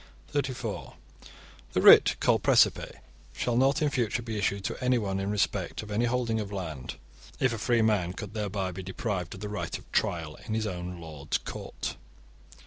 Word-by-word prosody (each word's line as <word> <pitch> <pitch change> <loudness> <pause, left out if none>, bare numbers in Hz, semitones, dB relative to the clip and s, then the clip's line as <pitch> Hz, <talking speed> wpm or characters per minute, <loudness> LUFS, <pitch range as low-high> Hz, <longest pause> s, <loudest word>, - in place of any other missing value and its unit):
(34) 135 -3 -3 0.8
The - - +2
writ - - +9
called - - +3
precipe - - +3 0.4
shall 120 - -1
not 135 +4 +3
in 150 - +2
future 120 -2 0
be 115 -1 -4
issued 100 -1 0
to - - -4
anyone 110 -7 +1
in 95 +1 -2
respect 105 +1 -1
of 105 - -9
any 110 +4 +1
holding 120 -2 0
of 105 -2 -4
land, 80 -9 -5 0.4
if 130 -2 +2
a 115 - -4
free 120 0 +2
man 100 -6 +2
could 105 0 -7
thereby 100 -3 -2
be 95 +2 -6
deprived 95 - -3
of 95 - -11
the 105 - -3
right 105 0 -3
of - - -18
trial 80 -3 -1
in 110 - -1
his 110 0 0
own 90 -2 -5
lord's 75 -3 -3
court. - - -6
105 Hz, 180 wpm, -28 LUFS, 95-115 Hz, 0.8 s, writ